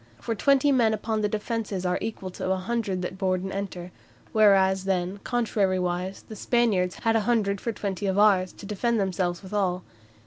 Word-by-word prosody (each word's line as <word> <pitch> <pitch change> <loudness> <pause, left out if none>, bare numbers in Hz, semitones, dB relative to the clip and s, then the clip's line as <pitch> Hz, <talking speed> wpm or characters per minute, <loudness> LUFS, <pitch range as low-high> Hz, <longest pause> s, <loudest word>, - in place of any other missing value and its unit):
For 230 - -2
twenty 275 +5 +3
men 230 -5 +3
upon 215 +1 -2
the 210 - +1
defences 210 -3 -3
are 180 0 0
equal 195 -4 -5
to 185 - -3
a - - +3
hundred 195 -2 -2
that 185 +1 -5
board 185 -1 0
and 190 - -4
enter; 185 -3 -5 0.4
whereas 190 -3 +4
then, 190 0 -1
contrariwise, 190 -5 -1
the 220 - -8
Spaniards 210 -6 +1
had 225 -1 +2
a - - +4
hundred 200 -4 +1
for 230 - -2
twenty 200 -2 -3
of 190 0 0
ours, 195 -3 +4
to - - -11
defend 220 +3 0
themselves 185 -2 -1
withal. 190 -2 -1
195 Hz, 180 wpm, -26 LUFS, 185-220 Hz, 0.4 s, whereas